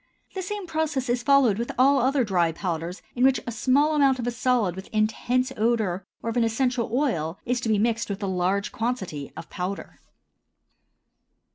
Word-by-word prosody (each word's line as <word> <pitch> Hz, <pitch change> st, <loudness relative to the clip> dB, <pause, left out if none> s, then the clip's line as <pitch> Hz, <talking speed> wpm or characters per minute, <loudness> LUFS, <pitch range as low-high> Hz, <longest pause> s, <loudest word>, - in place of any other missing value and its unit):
The 380 Hz, -, -3 dB
same 410 Hz, +1 st, -4 dB
process 310 Hz, -6 st, -2 dB
is 240 Hz, 0 st, +1 dB
followed 260 Hz, -6 st, +4 dB
with 235 Hz, -, -2 dB
all 275 Hz, +2 st, +5 dB
other 265 Hz, +1 st, +2 dB
dry 175 Hz, -6 st, +1 dB
powders 170 Hz, +1 st, -4 dB
in 250 Hz, -, +1 dB
which 265 Hz, 0 st, +5 dB
a 235 Hz, -, -3 dB
small 275 Hz, +7 st, +2 dB
amount 275 Hz, -3 st, +4 dB
of 240 Hz, -, -4 dB
a 245 Hz, -, 0 dB
solid 235 Hz, -6 st, +1 dB
with 190 Hz, +1 st, -8 dB
intense 235 Hz, +4 st, 0 dB
odor 215 Hz, -5 st, 0 dB, 0.2 s
or 230 Hz, -, -1 dB
of 235 Hz, -, -3 dB
an 240 Hz, -, +4 dB
essential 240 Hz, +1 st, 0 dB
oil 210 Hz, -, 0 dB
is 245 Hz, 0 st, 0 dB
to 230 Hz, -, -2 dB
be 215 Hz, -, +3 dB
mixed 230 Hz, +2 st, 0 dB
with 200 Hz, +1 st, -4 dB
a -, -, -1 dB
large 190 Hz, +2 st, 0 dB
quantity 190 Hz, -, -3 dB
of -, -, -7 dB
powder. 185 Hz, +2 st, -5 dB
235 Hz, 185 wpm, -25 LUFS, 195-260 Hz, 0.2 s, all